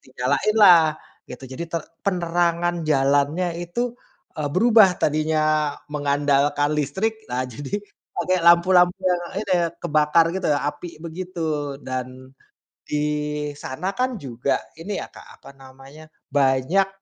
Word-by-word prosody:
dinyalainlah, 155 +5 +4 0.3
gitu. 125 +1 -9
Jadi, 135 +6 -5
ter 165 -2 -2 0.2
penerangan 175 -2 0
jalannya 145 +5 +2
itu, 235 +8 -3 0.5
eee, 145 -1 -1
berubah, 215 -2 +5
tadinya 155 -1 +1 0.2
mengandalkan 145 0 +1
listrik, 220 +9 -2
nah 125 +1 -1
jadi 140 - -7 0.4
pakai 185 0 +1
lampu-lampu 175 +1 +5
yang, 180 -1 +1 0.2
ini, 195 - -2 0.3
kebakar 155 +1 +3
gitu 190 - -2
ya, 145 - +2
api, 165 +3 -10
begitu. 160 -4 -4
Dan, 130 0 -6 0.6
di 150 0 -2
sana 180 +9 -4
kan, 255 -1 -1
juga, 130 -1 -2 0.2
ini 195 +5 -5
ya - - -7
Kak, - - -14
apa - - -13
namanya, 135 +3 -14 0.2
banyak, 140 +7 +2
155 Hz, 120 wpm, -22 LUFS, 140-180 Hz, 0.6 s, berubah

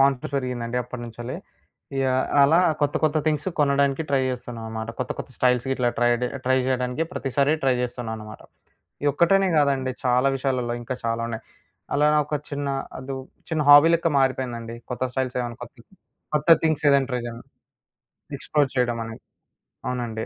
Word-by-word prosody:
Confidence 135 0 +2
పెరిగిందండి 125 -2 -3
అప్పటినుంచెల్లి. 120 0 -7 0.6
ఇగ 135 - +1 0.4
అలా 150 +5 +5 0.2
కొత్త 145 -1 +1
కొత్త 155 0 +2
థింగ్సు 155 +2 +1
కొనడానికి 140 +1 +2
ట్రై 135 - +3
చేస్తున్నాం 120 -2 -6
అనమాట. 110 0 -5
కొత్త 130 - -3
కొత్త - - -6
స్టైల్స్ 125 0 +2
గిట్లా 125 -2 +1
ట్రై 120 0 +4
జె 125 - +1 0.2
ట్రై 130 +1 +3
జేయడానికి 125 +2 0
ప్రతిసారి 140 0 +1
ట్రై 130 -1 +4
చేస్తున్నా 120 -2 -4
అనమాట. 110 0 -10 0.6
ఈ - - +2
ఒక్కటనే 190 +6 +3
గాదండి 135 -3 +2
చాలా 125 +2 +3
విషయాలలో 130 -3 -1
ఇంకా 125 +2 -4
చాలా 115 0 -1
ఉన్నాయి. 115 -1 -6 0.5
అలా 145 +1 +4 0.2
ఒక 150 - -3 0.2
చిన్న 145 -1 -3 0.3
అదు 135 +1 -5 0.4
చిన్న 160 -2 +1
హాబీ‌ 145 +3 +9
లెక్క 170 0 +1
మారిపోయిందండి. 120 -3 -1 0.2
కొత్త 125 - -5
స్టైల్స్ 130 -1 -2
ఏమన్నా 120 -1 -6
కొత్త, 120 - -17 0.6
కొత్త 150 +2 0 0.2
థింగ్స్ 155 -2 +1
ఏదైనా 140 -1 +3
ట్రై 125 - 0
చేయడం, 115 0 -7 1.0
ఎక్స్‌ప్లో‌ర్ 145 -3 0
చేయడం 120 -2 +1
అని. 115 0 -8 0.7
అవునండి. 120 -3 -3
130 Hz, 155 wpm, -24 LUFS, 120-140 Hz, 1.0 s, హాబీ‌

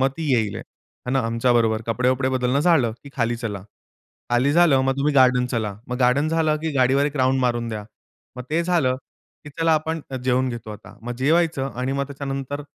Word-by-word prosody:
मग 135 - +4
ती 160 -1 -4
येईल. 110 -4 -1 0.5
आणि 135 +2 +1
आमच्याबरोबर 115 -2 +1
कपडे-वपडे 125 +3 +1
बदलणं 130 +1 +1
झालं 150 -9 +3
की - - -9
"खाली 120 -2 0
चला." 105 -5 -5 0.7
खाली 125 +4 +2
झालं 160 -5 +5
मग, 135 0 +1
"तुम्ही 145 +2 +1
गार्डन 125 -2 +4
चला." 110 -5 -2
मग 125 - -3
गार्डन 130 +4 +2
झालं 160 -1 +1
की 160 - -1
"गाडीवर 130 +2 +3
एक 150 - -5
राउंड 130 0 +2
मारून 120 -2 0
द्या." 105 -2 -5 0.5
मग 125 - -5
ते 165 +2 +1
झालं 165 -8 +1 0.5
की 150 - -9
"चला 165 0 +3
आपण 160 +1 -2 0.2
जेवून 130 0 +2
घेतो 120 -3 -6
आता." 105 0 -13
मग 120 +1 -4
जेवायचं 155 -4 +2
आणि 130 +2 -2
मग 140 0 -1
त्याच्यानंतर, 140 0 -5
130 Hz, 190 wpm, -22 LUFS, 120-145 Hz, 0.7 s, झालं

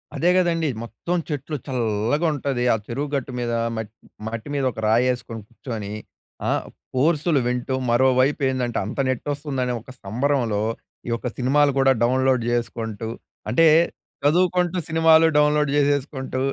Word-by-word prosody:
అదే 175 - +2
కదండీ. 165 -3 +2
మొత్తం 115 - -3
చెట్లు, 150 +1 -3
చల్లగా 120 +4 0
ఉంటది 135 -3 -2
ఆ - - +3
చెరువు 140 +5 -3
గట్టు 135 -1 -3
మీద 120 -1 -2 0.3
మ‌‌ట్ 110 0 -5 0.3
మట్టి 115 +4 -5
మీద 140 - 0
ఒక 110 - -9
రాయి 115 +3 +4
‌యెసుకొని 115 -3 -4
కూర్చొని 110 -4 -6 0.6
ఆహ్, - - 0 0.3
కోర్సులు 155 +2 +2
వింటూ 125 +1 -1 0.2
మరోవైపు 130 +3 +3
ఏందంటే, 125 -3 -1
అంత 110 - -6
నెట్ 130 0 -2
వస్తుందని 140 -3 -2
ఒక 130 - -12
సంబరంలో, 115 -1 0 0.5
ఈ - - -2
యొక్క 115 +1 -2
సినిమాలు 140 +3 +3
కూడా 135 0 +5
డౌన్‌లోడ్ 130 0 +2
చేసుకుంటూ, 115 -2 -3 0.4
అంటే 165 +8 +4 0.6
చదువుకుంటూ 180 +3 +2
సినిమాలు 160 0 +5
డౌన్‌లోడ్ 150 -1 +3 0.2
చేసుకుంటూ 130 -2 -2
130 Hz, 140 wpm, -23 LUFS, 120-150 Hz, 0.6 s, కూడా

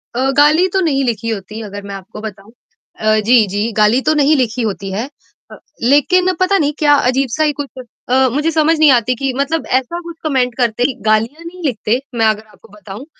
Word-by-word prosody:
अ, 265 +2 +1
गाली 305 +5 +5
तो 385 - +2
नहीं 275 -2 +1
लिखी 230 -1 -2
होती 210 +1 -5
अगर 205 +1 -7
मैं 200 - -5
आपको 195 +2 -10
बताऊँ। 215 0 -9 0.5
अ, 215 0 +2
जी, 235 -4 +6
जी, 205 +4 -2
गाली 215 +5 +3
तो 310 - +4
नहीं 300 +2 +4
लिखी 250 -2 -1
होती 200 -3 -3
है 225 +8 -4 0.4
अ, - - -9 0.3
लेकिन 355 +9 +3
पता 370 +2 +2
नहीं 295 -2 0
क्या 295 -1 +4 0.2
अजीब-सा 270 +3 0
ही 300 - +2
कुछ 280 - -7 0.4
अ, 260 +1 +3
मुझे 300 +4 0
समझ 320 +1 +2
नहीं 310 - +6
आती 245 0 +2
कि 270 +2 -2
मतलब 290 +3 -1
ऐसा 300 +7 -7
कुछ 340 -1 -9
कमेंट 255 -5 0
करते 240 -1 0
कि 265 - 0
गालियाँ 225 +9 0
नहीं 360 +2 -10
लिखते। 235 -2 0 0.2
मैं 225 -1 +2
अगर 215 0 +1
आपको - - -20
बताऊँ 205 +4 -10
255 Hz, 210 wpm, -16 LUFS, 215-295 Hz, 0.5 s, जी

